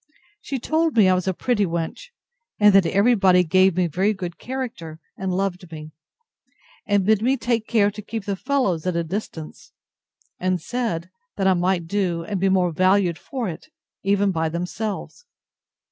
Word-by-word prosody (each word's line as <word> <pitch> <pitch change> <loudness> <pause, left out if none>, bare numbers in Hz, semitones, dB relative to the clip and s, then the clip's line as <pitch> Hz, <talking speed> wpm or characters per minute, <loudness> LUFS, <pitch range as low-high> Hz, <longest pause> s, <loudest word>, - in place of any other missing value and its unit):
She 275 - -4
told 315 +2 0
me 205 -4 +6
I 185 - +5
was 185 0 -1
a - - +3
pretty 235 -1 +1
wench, 170 - -4 0.5
and 210 -1 +6
that 195 -3 +5
every 200 +7 +3
body 185 -4 +4
gave 185 +1 +3
me 180 - +3
a - - 0
very 190 +7 0
good 180 -2 -6
character, 235 -12 -6 0.2
and 190 -1 -3
loved 180 -2 -2
me; 155 -1 -8 1.0
and 205 -2 +2
bid 215 0 +3
me 260 +4 +2
take 230 -2 -1
care 205 -3 +3
to 210 +1 -8
keep 215 0 -6
the 200 - -1
fellows 195 - -1
at 180 - 0
a 170 - 0
distance; 165 -3 -7 0.7
and 185 0 0
said, 185 -4 -3 0.2
that 195 - -1
I 190 - +5
might 180 -1 0
do, 175 -2 -1
and 195 +3 -3
be 195 +1 +2
more 185 -2 +2
valued 185 -1 +2
for 250 - -4
it, 170 - -7 0.3
even 200 0 +2
by 160 -2 -1
themselves. 200 - -5
190 Hz, 180 wpm, -23 LUFS, 175-215 Hz, 1.0 s, me